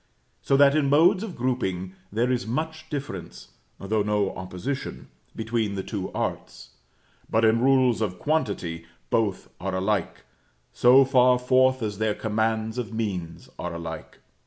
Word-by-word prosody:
So 135 Hz, -, +2 dB
that 140 Hz, 0 st, +6 dB
in 145 Hz, -2 st, +2 dB
modes 175 Hz, +7 st, +5 dB
of 210 Hz, -5 st, -6 dB
grouping 95 Hz, -8 st, -2 dB, 0.2 s
there 120 Hz, +5 st, +1 dB
is 125 Hz, -2 st, -1 dB
much 155 Hz, +5 st, -4 dB
difference 140 Hz, -, -6 dB, 0.3 s
(though 105 Hz, +2 st, 0 dB
no 105 Hz, -1 st, 0 dB
opposition) 95 Hz, +9 st, -5 dB, 0.3 s
between 110 Hz, -2 st, -1 dB
the 95 Hz, -, -3 dB
two 100 Hz, -4 st, -5 dB
arts; 65 Hz, 0 st, -4 dB, 0.6 s
but 110 Hz, 0 st, +3 dB
in 110 Hz, +1 st, +3 dB
rules 130 Hz, -3 st, +3 dB
of 95 Hz, -4 st, -2 dB
quantity, 100 Hz, -, -2 dB, 0.2 s
both 105 Hz, -5 st, 0 dB
are 95 Hz, 0 st, -3 dB
alike, 95 Hz, 0 st, -1 dB, 0.5 s
so 130 Hz, +2 st, +6 dB
far 125 Hz, -1 st, +4 dB
forth 130 Hz, 0 st, +3 dB
as 105 Hz, -2 st, -3 dB
their 110 Hz, -1 st, +1 dB
commands 110 Hz, +1 st, -1 dB
of 115 Hz, -2 st, -4 dB
means 95 Hz, -7 st, -4 dB
are 90 Hz, -1 st, -4 dB
alike. 80 Hz, -1 st, -7 dB
110 Hz, 145 wpm, -25 LUFS, 95-130 Hz, 0.6 s, that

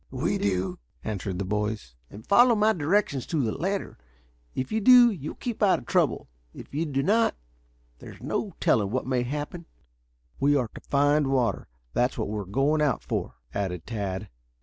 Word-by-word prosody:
"We -, -, -1 dB
do," 95 Hz, -4 st, -1 dB, 0.2 s
answered 100 Hz, -3 st, -3 dB
the 100 Hz, -, -2 dB
boys. 105 Hz, -, -2 dB, 0.3 s
"Follow 240 Hz, +3 st, +6 dB
my 215 Hz, +1 st, +3 dB
directions 160 Hz, -, 0 dB
to 155 Hz, -5 st, 0 dB
the 110 Hz, -, 0 dB
letter. 190 Hz, -, -3 dB, 0.6 s
If 130 Hz, -, -3 dB
you 220 Hz, 0 st, 0 dB
do 245 Hz, +1 st, +8 dB
you 155 Hz, -7 st, -5 dB
will -, -, -8 dB
keep 240 Hz, -3 st, -5 dB
out 200 Hz, -3 st, +5 dB
of -, -, -11 dB
trouble. 175 Hz, -9 st, +1 dB, 0.3 s
If -, -, -11 dB
you 160 Hz, +3 st, -1 dB
do 135 Hz, -1 st, -1 dB
not, 225 Hz, +7 st, +3 dB, 0.6 s
there's -, -, -11 dB
no -, -, -3 dB
telling 100 Hz, -3 st, +2 dB
what 130 Hz, +4 st, -2 dB
may 130 Hz, -1 st, 0 dB
happen." 150 Hz, +6 st, -5 dB, 0.7 s
"We 145 Hz, +1 st, +3 dB
are 125 Hz, -6 st, 0 dB
to -, -, -10 dB
find 145 Hz, +1 st, +2 dB
water. 130 Hz, -3 st, 0 dB, 0.3 s
That's 125 Hz, +1 st, +1 dB
what -, -, -2 dB
we 105 Hz, 0 st, -3 dB
are 100 Hz, -, -5 dB
going 135 Hz, +10 st, +1 dB
out 145 Hz, -6 st, +1 dB
for," -, -, -3 dB, 0.2 s
added 90 Hz, -5 st, -3 dB
Tad. 100 Hz, -3 st, -4 dB
135 Hz, 180 wpm, -26 LUFS, 105-170 Hz, 0.7 s, do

